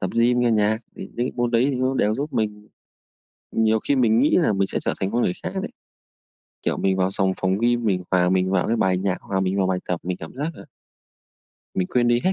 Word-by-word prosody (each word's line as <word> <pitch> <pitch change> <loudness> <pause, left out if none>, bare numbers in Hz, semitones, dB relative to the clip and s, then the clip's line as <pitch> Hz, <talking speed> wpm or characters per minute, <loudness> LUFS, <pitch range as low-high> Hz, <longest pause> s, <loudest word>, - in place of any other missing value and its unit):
tập 95 - -2
gym 120 +1 +3
nghe 120 -1 +3
nhạc, 110 -1 +2 0.2
thì - - -7
những - - -22
cái 125 +2 -1
môn 120 -1 0
đấy 120 +3 +3
thì 135 - -2
nó 130 +1 0
đều 105 -4 +2
giúp 145 +4 -4
mình 105 -1 -2 0.8
nhiều 110 0 +2
khi 140 - +3
mình 115 -3 +3
nghĩ 145 - +3
là 165 -11 +3
mình 100 -1 +1
sẽ - - -2
trở - - -1
thành 95 - -1
con 120 +1 +1
người 90 - +1
khác - - -4
đấy. - - -5 0.9
Kiểu, - - 0
mình 95 -1 +1
vào 95 0 +1
sòng 95 -1 +1
phòng 95 0 +1
gym, 120 0 +1
mình 95 -4 +1
hòa 90 -1 +3
mình 95 0 +1
vào 95 -2 +1
cái 115 - +1
bài 95 -3 +2
nhạc, 95 0 -2
hòa 95 - -2
mình 95 +1 0
vào 95 -2 +2
bài 95 -1 0
tập, 90 -2 -1
mình 90 0 -3
cảm 80 - -9
giác, 145 +5 -3
ờ - - -12 1.1
mình 90 - 0
quên 120 -1 +2
đi 120 0 +3
hết 185 - +3
105 Hz, 260 wpm, -23 LUFS, 95-120 Hz, 1.1 s, gym